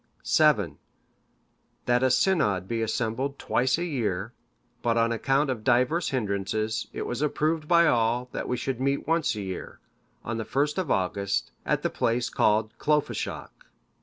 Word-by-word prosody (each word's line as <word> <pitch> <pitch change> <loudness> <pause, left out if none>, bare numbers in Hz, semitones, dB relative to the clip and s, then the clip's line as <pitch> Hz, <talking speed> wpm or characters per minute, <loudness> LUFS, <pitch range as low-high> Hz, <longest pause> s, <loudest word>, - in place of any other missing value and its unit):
"VII. 105 - +3 1.1
That 125 0 +2
a 130 - +3
synod 105 - +2
be 115 +1 -2
assembled 120 +5 -2
twice 130 +3 +1
a 170 - -2
year; 110 - -2 0.5
but 115 -1 +1
on 115 0 +3
account 135 +4 +1
of 115 -4 -5
divers 130 +8 +2
hindrances, 110 -1 -2
it - - -4
was 125 +3 -4
approved 155 +1 0
by 170 0 +5
all, 120 -2 +2
that - - -4
we 125 - -1
should 130 -1 -3
meet 140 +1 0
once 165 -6 +1
a 105 - -4
year, 95 -2 -6 0.5
on 115 0 -3
the 115 - -2
1st 145 - 0
of 180 -6 -2
August, 100 0 0 0.2
at - - +1
the - - 0
place 120 +1 0
called 110 +2 +2
Clofeshoch. 150 -1 -1
120 Hz, 160 wpm, -27 LUFS, 110-140 Hz, 1.1 s, by